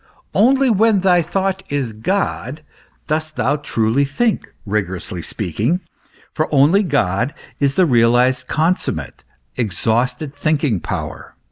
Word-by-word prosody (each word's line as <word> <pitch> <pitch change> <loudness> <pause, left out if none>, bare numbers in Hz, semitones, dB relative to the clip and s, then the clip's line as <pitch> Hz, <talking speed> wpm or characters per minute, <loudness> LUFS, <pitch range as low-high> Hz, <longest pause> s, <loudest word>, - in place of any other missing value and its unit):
Only 265 +4 +4
when 215 -1 +3
thy 180 -2 +4
thought 190 +3 -1
is 135 -6 -2
God, 150 - -2 0.4
dost 155 0 -2
thou 130 +4 +1
truly 115 -2 +1
think, 215 +12 -1
rigorously 95 -4 -3
speaking; 110 - -1 0.5
for 155 - -1
only 150 +8 +5
God 125 - 0 0.2
is 140 -1 +1
the 185 - +4
realized, 125 0 +3
consummate, 165 +4 -1 0.3
exhausted 125 - -1
thinking 145 - 0
power. - - -6
145 Hz, 115 wpm, -19 LUFS, 115-180 Hz, 0.5 s, only